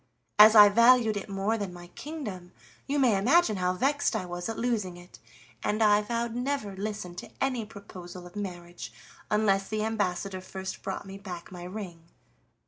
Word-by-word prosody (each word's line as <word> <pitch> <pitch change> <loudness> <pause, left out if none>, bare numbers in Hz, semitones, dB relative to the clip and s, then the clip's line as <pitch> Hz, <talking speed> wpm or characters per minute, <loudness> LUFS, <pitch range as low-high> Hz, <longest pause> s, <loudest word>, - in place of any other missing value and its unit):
As 215 +1 +10
I 210 -1 +11
valued 235 +1 +5
it 200 - -5
more 200 +3 -1
than 200 -3 -3
my 175 0 -10
kingdom, 205 - -7 0.3
you 285 +1 0
may 250 -6 +4
imagine 235 - +3
how 180 0 +1
vexed 280 +8 +1
I 185 - -2
was 175 +2 -5
at 225 - -4
losing 215 -7 -1
it, 175 0 -15 0.4
and 215 +2 +1
I 210 0 +5
vowed 235 +2 -2
to 240 - -3
never 250 -7 -2
listen 205 -2 -5
to - - -7
any 255 -4 0
proposal 185 -4 -10
of 175 - -13
marriage 175 - -6 0.4
unless 195 -2 +2
the 215 0 -2
ambassador 195 -3 -2
first 190 0 -7
brought 195 +1 -5
me 195 0 -9
back 180 -4 -8
my 175 -1 -8
ring. 180 -4 -8
205 Hz, 180 wpm, -28 LUFS, 180-225 Hz, 0.4 s, I